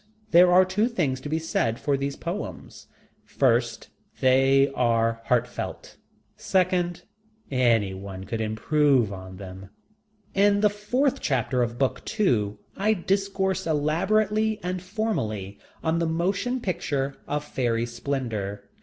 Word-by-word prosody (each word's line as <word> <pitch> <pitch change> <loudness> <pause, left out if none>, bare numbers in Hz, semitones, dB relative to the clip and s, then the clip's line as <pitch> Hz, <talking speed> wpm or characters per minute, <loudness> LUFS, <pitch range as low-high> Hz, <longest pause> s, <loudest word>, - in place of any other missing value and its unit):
There 175 +1 +7
are 185 +1 +6
two 200 +5 +1
things 150 - -1
to 145 - -6
be 160 - 0
said 120 -8 -1
for 145 -2 +1
those 140 0 -2
poems. - - -6 0.4
First, - - 0 0.3
they 135 +1 +4
were 115 -2 +2
heartfelt. - - -2 0.4
Second, 180 -2 0 0.5
any 115 -7 +2
one 95 0 -7
could 110 +3 -4
improve 120 +1 +2
on 95 -1 -9
them. 95 0 -9 0.6
In 200 +1 +3
the 210 -1 +4
fourth 245 +7 0
chapter 125 -2 0
of 120 0 -1
book 135 0 0
two 115 - 0 0.2
I 215 +3 +2
discourse 190 -1 -1
elaborately 210 +8 +1
and 180 0 -2
formally 115 - -3 0.2
on 160 +1 +1
The 170 - 0
Motion 195 +10 -1
Picture 140 -8 -2
of 150 0 -2
Fairy 120 -4 -1
Splendor. 115 -6 -4
145 Hz, 130 wpm, -25 LUFS, 115-190 Hz, 0.6 s, There